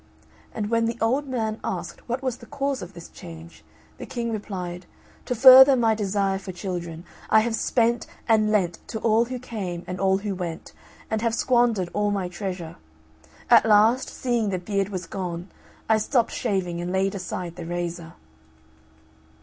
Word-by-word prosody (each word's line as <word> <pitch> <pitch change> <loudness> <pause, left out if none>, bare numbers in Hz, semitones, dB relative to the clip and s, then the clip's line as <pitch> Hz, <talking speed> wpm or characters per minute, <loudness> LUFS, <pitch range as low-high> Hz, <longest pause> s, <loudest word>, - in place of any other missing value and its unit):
And 210 0 -4
when 230 0 +2
the 230 0 -2
old 260 +6 +1
man 225 -4 -2
asked - - -5
what 250 +3 -2
was 255 -2 -2
the 235 - -14
cause 275 +1 -2
of 180 +2 -8
this 170 -1 -10
change, 165 -2 -12 0.4
the - - -7
King 235 -2 -3
replied, 180 -5 -5 0.4
"To 250 - -2
further 265 +2 +9
my 230 -3 +3
desire 200 -2 0
for 190 -1 -7
children, 175 -2 -6 0.2
I 220 - +6
have 225 0 -1
spent 235 0 +1 0.2
and 215 -1 +3
lent 185 -5 +1
to 220 - -5
all 225 +1 +3
who 255 +1 -5
came 195 -8 -5
and 180 0 -5
all 190 0 +3
who 200 0 -3
went, 175 -3 -6 0.4
and 220 -1 0
have 230 -1 0
squandered 235 -8 +2
all 205 0 +1
my 200 -3 -1
treasure. 180 -3 -6 0.7
At - - +7
last, 220 +4 +4
seeing 240 -4 -1
the 190 - -1
beard 195 +2 -2
was 185 -3 -5
gone, 175 0 -5 0.4
I 220 -1 +4
stopped 235 +2 +1
shaving 185 -6 -2
and 175 +1 -3
laid 190 +1 +1
aside 180 -2 -5
the 170 -1 -7
razor." 175 -1 -4
205 Hz, 175 wpm, -24 LUFS, 180-230 Hz, 0.7 s, further